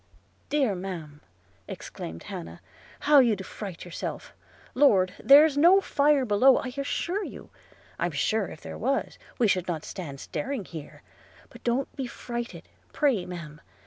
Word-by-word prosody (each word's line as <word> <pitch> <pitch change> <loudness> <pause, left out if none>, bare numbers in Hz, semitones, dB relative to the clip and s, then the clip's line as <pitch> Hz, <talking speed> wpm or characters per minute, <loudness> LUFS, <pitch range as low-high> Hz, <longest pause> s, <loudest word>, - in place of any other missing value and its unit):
'Dear 275 -8 +2
ma'am,' 175 -6 -7 0.5
exclaimed 80 0 -8
Hannah, 80 +1 -8 0.4
'how 295 -1 +6
you 235 -5 +4
do 190 - -7
fright 190 -3 -8
yourself! 175 - -6 0.2
– - - -26
Lord! 200 -9 +4
there's 285 +1 +7
no 355 +5 +7
fire 290 -6 +2
below, 245 +5 +5
I 255 -2 -4
assure 345 +8 -2
you; - - -9 0.5
I'm 175 - +1
sure 195 +7 0
if 155 - -11
there - - -8
was, 270 +5 -1 0.2
we 235 - +3
should 185 -3 +1
not 165 -4 -3
stand 145 -7 -7
staring 265 - -4
here; 160 -4 -10 0.5
but - - -14
don't 245 +3 -1
be 265 -3 -3
frightened, 240 0 -6 0.3
pray, 265 - +1
ma'am! 165 -4 -8
220 Hz, 150 wpm, -27 LUFS, 175-275 Hz, 0.5 s, there's